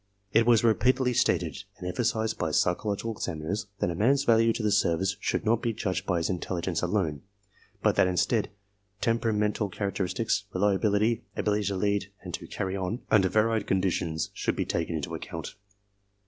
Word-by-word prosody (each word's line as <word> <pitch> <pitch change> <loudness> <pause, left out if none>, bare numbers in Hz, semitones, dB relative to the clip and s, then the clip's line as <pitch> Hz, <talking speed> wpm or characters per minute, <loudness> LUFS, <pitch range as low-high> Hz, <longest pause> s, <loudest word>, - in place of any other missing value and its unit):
It 115 +1 +4
was 120 -2 +5
repeatedly 125 +3 +3
stated - - +1
and 90 - -6
emphasized 110 +2 -1
by 80 - 0
psychological 100 +7 0
22 - - -4
ARMY 80 - -5
MENTAL 80 +3 -4
TESTS 105 - -2
examiners 100 0 -41
((that 85 - 0
a 105 +7 +1
man's 140 +1 +4
value 115 -1 +4
to 110 - -4
the 105 - +2
service 95 -1 +2
should - - -1
not 115 +1 +2
be 115 -2 -1
judged 95 -3 -2
by 90 - +1
his 85 - -1
intelligence 90 -1 -2
alone, 90 -6 0 0.6
but - - +3
that - - +5
instead 100 +5 +1 0.5
temperamental 105 -2 0
characteristics, 100 +2 -1
reliability, 105 +3 +2
ability 105 0 +1
to 100 0 -1
lead 100 +1 0
and 90 -2 -7
to - - -5
"carry 95 0 -3
on" 95 +5 -3
under 95 -3 +5
varied 110 +2 +1
conditions 90 -4 0
should - - -1
be - - -1
taken 85 0 -2
into 75 -3 -4
account. - - -6
100 Hz, 180 wpm, -28 LUFS, 90-110 Hz, 0.6 s, was